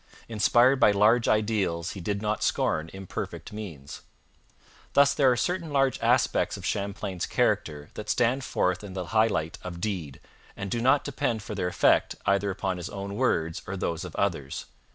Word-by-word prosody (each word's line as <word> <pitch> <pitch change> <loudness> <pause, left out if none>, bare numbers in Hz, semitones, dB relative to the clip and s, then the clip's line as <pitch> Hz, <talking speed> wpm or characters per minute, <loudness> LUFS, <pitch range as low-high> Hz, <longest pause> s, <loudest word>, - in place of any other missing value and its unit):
Inspired 120 +4 +4
by - - +6
large 105 +4 +4
ideals, 100 -6 +1
he 100 - -7
did 100 +4 -2
not 105 0 -1
scorn 80 +1 0
imperfect 95 +2 -6
means. 80 -10 -8 0.9
Thus 140 0 +5
there 135 -3 +4
are 125 - +1
certain 170 +3 -1
large 135 -2 +2
aspects - - +2
of - - -8
Champlain's 100 -2 -3
character 75 -1 0
that 105 - -7
stand 125 +2 +2
forth 90 -5 0
in 100 -2 -8
the 90 -1 -4
high 110 0 +5
light 80 -7 -2
of 85 -2 -7
deed, 90 -9 -4 0.4
and 100 -1 -5
do 120 - -1
not 130 +4 +4
depend 120 -5 -2
for 110 - -6
their 90 - -1
effect 90 - +3
either 100 0 +2
upon 95 -1 -2
his 90 +2 -6
own 100 0 -6
words 85 -9 0
or 95 +1 -4
those 85 -2 -2
of 90 -3 -8
others. 80 -9 -2
100 Hz, 175 wpm, -27 LUFS, 90-115 Hz, 0.9 s, by